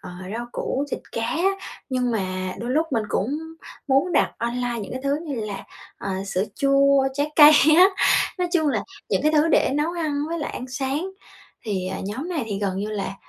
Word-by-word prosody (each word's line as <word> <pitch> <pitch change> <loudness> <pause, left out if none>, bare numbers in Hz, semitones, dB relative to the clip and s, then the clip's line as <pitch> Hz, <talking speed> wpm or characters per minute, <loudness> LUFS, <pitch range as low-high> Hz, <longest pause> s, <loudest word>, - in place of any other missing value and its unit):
ờ, 180 - -9 0.3
rau 240 0 -4
củ, 275 +2 -2
thịt - - -3
cá 230 - -2
á. 340 +8 +1 0.4
Nhưng 250 -2 0
mà 185 -3 -2
đôi 240 +2 -4
lúc 315 +5 +2
mình 225 - +1
cũng 270 +11 -1 0.5
muốn 275 +7 +3
đặt - - +3
online 240 0 -2
những 200 - -7
cái 260 - -4
thứ 280 +1 +1
như 275 -6 -3
là, 195 -2 -6 0.3
ờ, - - -5 0.2
sữa 195 0 0
chua, 275 -1 +4
trái 290 +2 -1
cây 300 -1 +10 0.2
á. 365 - +9 0.5
Nói 360 -1 0
chung 315 -4 +2
là 220 -7 0 0.3
những 195 - +1
cái 305 +1 +3
thứ 310 +2 +4
để - - +3
nấu 300 +4 0
ăn 305 -4 -2
với 335 0 -3
lại 295 - -3
ăn 255 - -6
sáng. 275 +8 -2 0.5
Thì, 190 -4 -2
ờ, - - -4
nhóm 255 - -4
này 310 -9 -2
thì 205 -3 -3
gần 195 -2 -1
như 210 +2 -3
là, 200 -2 -3
265 Hz, 210 wpm, -23 LUFS, 215-300 Hz, 0.5 s, cây